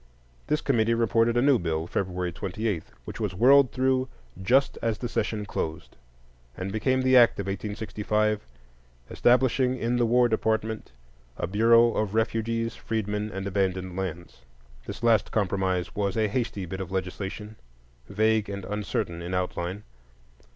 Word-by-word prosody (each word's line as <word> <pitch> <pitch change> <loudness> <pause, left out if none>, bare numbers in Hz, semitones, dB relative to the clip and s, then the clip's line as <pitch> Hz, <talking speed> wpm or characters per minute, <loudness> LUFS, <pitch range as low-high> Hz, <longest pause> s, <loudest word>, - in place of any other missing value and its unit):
This 150 - +1
committee 115 -4 +2
reported 115 +1 +2
a 120 - +3
new 140 -3 +4
bill, 80 -2 -2
February 90 0 -2
28, 95 +1 -3 0.2
which - - -8
was 105 -5 -2
whirled 130 +5 +6
through 130 0 +1 0.3
just 130 +9 +3
as 115 -2 0
the 120 - -4
session 110 -2 -2
closed, 80 -4 -5 0.6
and 95 +1 -4
became 130 +5 +1
the 130 0 +4
act 120 -4 +6
of 100 - -2
1865 105 +1 -1 0.7
establishing 130 +1 +3
in 120 0 0
the 120 -1 +2
War 120 +1 +4
Department 110 - -1 0.5
a - - -2
"Bureau 115 +4 +4
of 105 -1 -1
Refugees, 115 +1 -1
Freedmen, 105 -1 -3
and 95 -1 -5
Abandoned 95 -2 -1
Lands." 85 -2 -6 0.5
This - - -7
last 115 -2 +3
compromise 95 -4 -1
was 100 0 -1
a 110 -1 +2
hasty 105 -3 -2
bit 95 +2 -6
of 95 - -6
legislation, 95 +3 -5 0.5
vague 110 0 +1
and 100 -2 -5
uncertain 100 -4 -3
in 90 +2 -4
outline. 90 +2 -3
105 Hz, 145 wpm, -26 LUFS, 95-115 Hz, 0.7 s, whirled